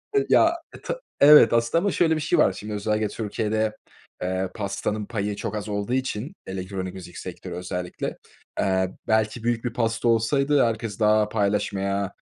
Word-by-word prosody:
E 410 - +3
ya, 335 0 +5 0.2
e - - -12
ta - - -4 0.2
evet, 145 -6 +8
aslında 115 +7 +2
ama 200 - +2
şöyle 160 -3 +2
bir 155 - -2
şey 170 - +1
var: 95 - +4
Şimdi 105 +2 -7
özellikle 105 +1 0
Türkiye'de, 110 0 -2 0.4
eee, 95 +1 -1
pastanın 105 0 -3
payı 105 -1 -3
çok 110 0 -4
az 105 0 -4
olduğu 100 +3 -2
için, 130 - -2
elektronik 95 0 -5
müzik 90 -2 -10
sektörü - - -7
özellikle, 90 0 -4 0.4
eee, 95 -1 +1 0.2
belki 110 +1 +1
büyük 120 0 0
bir 120 - -2
pasta 115 0 0
olsaydı 135 +5 +3
herkes 110 -2 -3
daha 105 0 +3
paylaşmaya 100 -2 -1
110 Hz, 165 wpm, -24 LUFS, 100-115 Hz, 0.4 s, evet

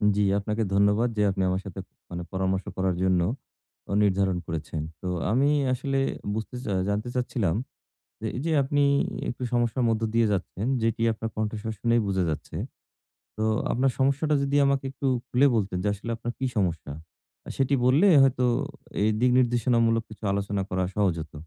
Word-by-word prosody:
জি, 105 - +1 0.2
আপনাকে 105 +2 -1
ধন্যবাদ 105 +4 +3
যে - - +2
আপনি 95 0 -1
আমার 95 +1 -1
সাথে 95 - -7 0.3
মানে 90 0 -5
পরামর্শ 95 0 -1
করার 95 -1 +1
জন্য 95 -2 +3 0.8
নির্ধারণ 95 -2 +2
করেছেন। 80 -1 -4 0.2
তো - - -5 0.2
আমি 135 +5 +3 0.2
আসলে 135 +2 -1 0.4
বুঝতে 110 +3 -5
চা 105 - -2 0.2
জানতে 105 +4 -1
চাচ্ছিলাম 115 -8 0 0.7
যে 110 - -2
এই 125 - -3
যে 165 - 0
আপনি 145 +2 +1 0.5
একটু 125 - -5
সমস্যার 120 +1 +1
মধ্য 115 0 0
দিয়ে 115 -1 +3
যাচ্ছেন, 100 +1 -2 0.2
যেটি 115 0 0
আপনার 110 +1 -5
কণ্ঠস্বর 110 +1 -3
শুনেই 115 +1 +2
বুঝা 95 -2 +1
যাচ্ছে। 75 - -5 0.8
তো 110 - -1 0.3
আপনার 130 +2 +2
সমস্যাটা 145 +3 +2
যদি 140 +1 +1
আমাকে 140 -1 +1
একটু 135 +1 -3 0.2
খুলে 130 +3 +4
বলতেন 100 -4 -1
যে - - 0
আসলে 105 +3 -7
আপনার 120 +1 -4
কি 130 - -1
সমস্যা? 85 -7 -1 0.7
সেটি 135 +1 +2
বললে 140 +10 +5 0.2
হয়তো 130 -1 +2 0.6
এই 105 - +3
দিক 125 0 +3
নির্দেশনামূলক 115 -2 +2
কিছু 110 0 -13
আলোচনা 100 0 -1
করা 95 0 0
সহজ 100 -4 +2
হত। 80 +1 -10
110 Hz, 165 wpm, -26 LUFS, 95-125 Hz, 0.8 s, বললে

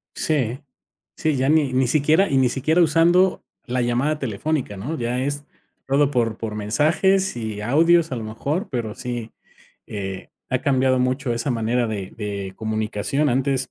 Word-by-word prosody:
Sí, 135 -5 -1 0.6
sí, 155 -3 0
ya 130 +2 +1
ni 150 -4 +3
ni 130 0 +2
siquiera 155 +8 +3
y 135 - +2
ni 130 -2 +4
siquiera 155 +7 +2
usando 170 +3 +3 0.2
la 125 0 0
llamada 125 +6 0
telefónica, 130 -1 -2
¿no?, 130 +11 -4
ya 120 +1 -1
es 145 +2 -2 0.4
todo 140 +1 +3
por 115 -5 0
por 110 -2 -4
mensajes 155 - +1
y 110 -3 -4
audios 165 +5 +3
a - - -1
lo 115 - -5
mejor, 140 - -3
pero 115 -5 -3
sí, 120 -2 -5 0.6
eh, 95 -2 -6 0.2
ha 130 - +1
cambiado 130 -2 +2
mucho 130 0 0
esa 115 +4 -2
manera 120 +1 0
de 100 -4 -5
de 100 -3 -4
comunicación. 110 +6 -1
Antes, 130 +1 0
130 Hz, 160 wpm, -22 LUFS, 115-150 Hz, 0.6 s, ni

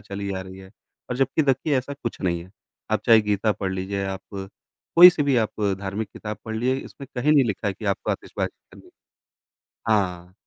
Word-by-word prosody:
चली 100 0 -5
आ 95 - -3
रही 95 0 -11
है 95 0 -13 0.4
और 125 - -1
जबकि 135 +4 +2
देखिए 140 +2 +1
ऐसा 130 +3 -5
कुछ 125 -5 -6
नहीं 85 -2 0
है। 95 - -17 0.4
आप 110 - +2
चाहे 115 -2 +8
गीता 105 +1 +1
पढ़ 95 -2 -3
लीजिए 95 +1 -3
आप, 95 -1 -4
कोई-सी 155 - +4
भी 140 -3 +2
आप 110 -1 -1 0.2
धार्मिक 100 +2 -3
किताब 105 -1 -6
पढ़ 110 0 -5
लीजिए, 125 +3 +1
इसमें 140 - -11
कहीं 145 +5 +3
नहीं 140 -3 +5
लिखा 105 -1 -2
है 95 - -2
कि 110 - -10
आपको - - -4
आतिशबाज़ी - - -3 0.2
करनी। - - -16 1.0
हाँ, 90 -4 0
105 Hz, 195 wpm, -24 LUFS, 95-130 Hz, 1.0 s, चाहे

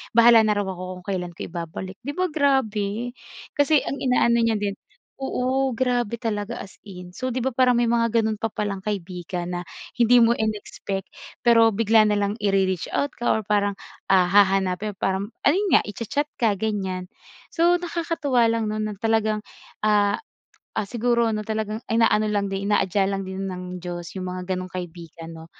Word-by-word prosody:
bahala 235 -1 +8
na 210 - +2
raw 205 0 0
ako 185 -1 -6
kung - - -33
kailan 180 -2 -3
ko - - -6
ibabalik. 175 +3 -6
'Di 280 +4 -4
ba 370 - +1
grabe? 245 -6 0 0.5
kasi 290 0 +4
ang 280 - -4
inaano 235 -2 +3
niya 230 -1 +2
din 205 -1 -2 0.5
oo 265 -1 0
grabe 245 -2 0
talaga, 225 -1 -3
as 190 - -15
in. 180 -2 -9
So, 255 +8 -4
'di 255 -1 -2
ba 265 - 0
parang 250 0 +3
may 235 -1 +2
mga 230 -1 +3 0.2
ganun 215 -1 -1
pa 225 - 0
palang 205 -2 -3
kaibigan 180 -2 -4
na 175 0 -3 0.4
hindi 240 +1 +5
mo 230 - +5
in-expect, 210 -3 -3 0.3
pero 230 -2 +5
bigla 220 0 +4
na 210 - +2
lang 205 0 0
ire-reach 195 -3 +1
out 285 - 0
ka 240 - -1
or 220 - -2
parang, 205 -1 +1 0.3
ah, 185 -2 +4
hahanapin 195 0 +3
parang 190 +1 -1 0.2
ayun 380 +7 +3
nga - - +5
i-cha-chat 230 +7 -2 0.2
ka 220 -4 +3
gan'yan. 190 -3 -3 0.4
So, 345 +1 +4
nakakatuwa 330 -8 0
lang 225 -2 0
'no 215 - -3
na 215 -1 -2
talagang, 215 0 0 0.4
ah, 205 -1 +3 0.6
ah, 205 - -1
siguro 235 +1 +1
ano 215 -1 -2
talagang 215 +1 -3
inaano 225 -2 +3
lang 205 -1 0
din 195 +1 -2
inaadya 195 -1 +2
lang 195 -1 -3
din 190 +1 -4
ng 180 -1 -7
Diyos 175 -1 -6
yung 185 -1 -4
mga 185 +1 -3
ganong 185 0 -5
kaibigan 170 -2 -8
'no 160 0 -10
210 Hz, 180 wpm, -24 LUFS, 190-235 Hz, 0.6 s, bahala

